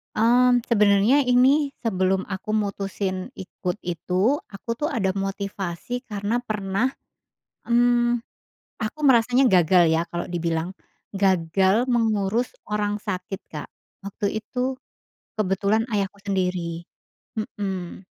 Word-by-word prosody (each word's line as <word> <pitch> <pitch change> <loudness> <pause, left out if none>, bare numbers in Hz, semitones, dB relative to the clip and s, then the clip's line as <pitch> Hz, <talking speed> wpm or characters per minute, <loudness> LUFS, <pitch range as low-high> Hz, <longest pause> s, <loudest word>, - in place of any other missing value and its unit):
Mmm, 245 +2 +5
sebenarnya 210 +5 +4
ini 265 +4 +4
sebelum 190 -4 0
aku 190 +2 -4
mutusin 200 -1 -2
ikut 190 -4 -5
itu, 180 - 0 0.2
aku 200 +3 -12
tuh 300 - 0
ada 190 -4 0
motivasi 195 +3 -4
karena 210 -1 -2
pernah, 210 +2 -1 0.8
mmm, 240 0 +3 0.6
aku 220 +6 -4
merasanya 250 -1 +4
gagal 180 0 +5
ya 165 +1 +1
kalau 170 +1 -5
dibilang 170 0 -1 0.4
gagal 195 +4 +2
mengurus 225 - +1 0.2
orang 210 0 -1
sakit, 190 -1 -4
Kak. 150 -2 -6 0.4
Waktu 200 +1 -2
itu 250 +4 -3 0.6
kebetulan 205 +2 +1
ayahku 200 -1 -1
sendiri. 180 -4 -1 0.6
Mhm. 190 -3 -5
200 Hz, 105 wpm, -24 LUFS, 190-235 Hz, 0.8 s, Mmm